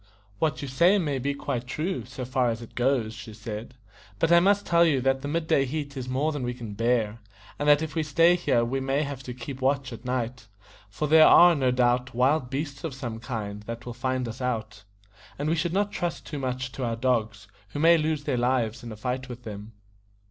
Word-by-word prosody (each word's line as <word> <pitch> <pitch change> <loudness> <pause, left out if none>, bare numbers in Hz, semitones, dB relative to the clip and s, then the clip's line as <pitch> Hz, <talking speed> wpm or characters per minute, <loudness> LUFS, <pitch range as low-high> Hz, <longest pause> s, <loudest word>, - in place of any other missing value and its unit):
"What 155 -1 0
you - - -4
say 170 +10 +4
may 145 -8 -1
be 140 +2 -1
quite 125 -4 -3
true, 160 +8 -3
so 130 0 -7
far 130 -1 +1
as 115 -1 -2
it 115 - -11
goes," 125 -3 +1
she 110 -1 -10
said; 110 +2 -7 0.4
"but 165 +9 +1
I 170 - +8
must 200 +3 +3
tell 170 0 +4
you 155 -5 +3
that 135 +1 +1
the 145 - -4
mid 160 +2 -1
day 140 - +3
heat 140 +1 -4
is 130 -1 -5
more 140 +5 0
than 145 -3 -4
we 125 0 -3
can 115 -4 -7
bear, 115 0 0 0.4
and 145 0 +1
that 145 +1 +5
if 160 - -5
we 160 - 0
stay 165 +3 +4
here 120 -9 +1
we 135 +3 -1
may 135 +2 0
have 140 -2 -5
to 125 -1 -7
keep 130 +2 -7
watch 135 -1 0
at 115 +1 -10
night, 125 -2 -3 0.4
for 150 +9 -3
there 155 +1 +7
are, 175 0 +8
no 135 -5 +1
doubt, 125 0 +1
wild 130 +1 +2
beasts 140 +1 -4
of 155 -5 -4
some 120 -4 -5
kind 105 -4 -5
that 115 +1 -6
will 120 - -5
find 130 0 -2
us 115 +3 -7
out; 110 -4 -3 0.5
and 150 +2 -1
we - - +2
should 170 +1 0
not 200 +3 0
trust 175 -1 -3
too 150 - -5
much 130 0 -3
to 125 +3 -5
our 115 -1 -1
dogs, 115 -3 -1 0.2
who 105 - -7
may 165 +2 +6
lose 155 -2 0
their 130 - -1
lives 120 -1 0
in 120 -1 -8
a - - -6
fight 130 +3 -3
with 125 0 -8
them." 105 0 -8
130 Hz, 235 wpm, -26 LUFS, 120-150 Hz, 0.5 s, I